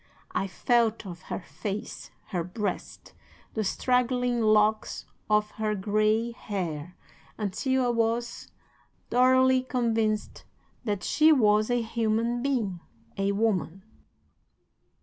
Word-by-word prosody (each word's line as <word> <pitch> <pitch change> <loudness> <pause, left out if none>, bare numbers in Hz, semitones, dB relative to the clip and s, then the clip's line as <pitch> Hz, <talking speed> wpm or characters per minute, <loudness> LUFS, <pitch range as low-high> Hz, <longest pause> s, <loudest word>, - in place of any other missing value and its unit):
I 195 - -1
felt 230 +2 +1
of 175 -2 -8
her - - -3
face, 195 +6 -6 0.2
her 180 -4 -1
breast, 185 +2 -5 0.4
the 220 - -1
straggling 250 +2 +1
locks 215 0 +2 0.2
of 210 0 +2
her 215 -1 +1
gray 215 +3 +1
hair 180 -7 -5 0.4
until 250 +6 0
I - - +1
was 230 0 -1 0.6
thoroughly 260 +1 +5
convinced 225 -4 -1 0.4
that 205 -3 -2
she 310 +1 +4
was 215 -6 +4
a 245 -1 +1
human 230 +1 0
being 235 -10 -1 0.4
a 195 0 0
woman. 195 -4 -1
220 Hz, 110 wpm, -27 LUFS, 205-240 Hz, 0.6 s, thoroughly